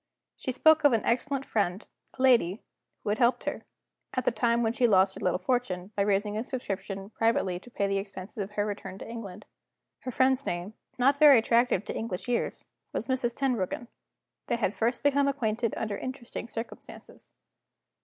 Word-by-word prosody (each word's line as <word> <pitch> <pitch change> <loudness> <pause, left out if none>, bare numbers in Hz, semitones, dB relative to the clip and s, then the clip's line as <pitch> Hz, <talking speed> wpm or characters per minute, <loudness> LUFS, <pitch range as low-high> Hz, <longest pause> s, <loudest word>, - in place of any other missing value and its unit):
She 260 - -4
spoke 315 +5 +5
of 290 -3 +6
an 225 - +1
excellent 275 +3 0
friend 200 -1 -1 0.3
(a - - -7
lady), 230 -7 +4 0.4
who 210 - -2
had 210 - 0
helped 240 +1 +3
her, - - -3 0.5
at 255 - -1
the - - +4
time 235 +1 +1
when 225 0 +1
she 240 0 +3
lost 190 -2 +4
her - - -10
little 180 - +1
fortune, 210 -7 -1
by 200 - +1
raising 205 +1 +1
a 220 - -1
subscription 195 -5 -5
privately 225 -6 +1
to 245 - -15
pay 205 -4 -1
the 195 0 +1
expenses 195 +1 -8
of 200 +1 -5
her 205 0 0
return 205 -2 -5
to - - -9
England. 210 -4 -8 0.5
Her - - -6
friend's 260 +2 +2
name 175 +1 -4 0.2
not 275 +3 +3
very 295 -4 +9
attractive 230 -3 +2
to - - -5
English 220 -3 -4
ears 245 -1 -1 0.3
was - - -2
Mrs. 255 -3 -1
Tenbruggen; 240 -3 -1 0.6
they - - +1
had 210 -4 0
first 235 +3 -1
become 285 -1 +3
acquainted 230 -4 -1
under 210 -2 -2
interesting 250 -2 -6
circumstances. 225 0 -9
230 Hz, 185 wpm, -28 LUFS, 200-250 Hz, 0.6 s, very